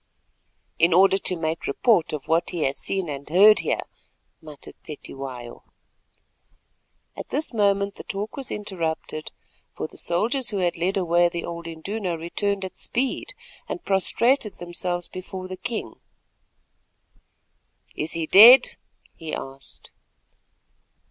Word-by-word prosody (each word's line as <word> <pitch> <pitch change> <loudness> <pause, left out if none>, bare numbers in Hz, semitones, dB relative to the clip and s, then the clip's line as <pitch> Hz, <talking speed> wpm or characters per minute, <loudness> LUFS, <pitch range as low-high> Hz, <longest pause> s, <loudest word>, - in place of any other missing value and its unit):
"In 170 +1 +4
order 195 +1 +5
to 185 - 0
make 160 -1 -3
report 180 - +2
of 150 -3 -6
what 165 +1 +1
he 170 -3 -2
has 135 +1 -1
seen 190 -2 -1
and 140 -1 -7
learned 205 +6 +7
here," - - -1 0.6
muttered 150 -2 -12
Cetywayo. 135 -5 -9 1.5
At - - -8
this 305 -3 +1
moment 200 -2 +1
the - - -10
talk 205 +2 -5
was 270 -3 -4
interrupted, 165 -6 -4 0.4
for - - -4
the - - -8
soldiers 230 +9 +1
who 205 - -3
had 180 -2 0
led 180 +4 -1
away 175 -1 +3
the 170 0 -5
old 170 0 -7
Induna 175 +2 -4
returned 195 +4 -2
at 185 - -9
speed, 260 +2 -2 0.3
and 345 - -5
prostrated 215 +4 +2
themselves 175 0 -4
before 185 0 -8
the 185 - -6
king. 215 - -5 2.0
"Is 155 - -2
he 165 -1 -1
dead?" 230 +10 +8 0.4
he 160 -1 -6
asked. 135 0 -11
180 Hz, 130 wpm, -24 LUFS, 160-200 Hz, 2.0 s, dead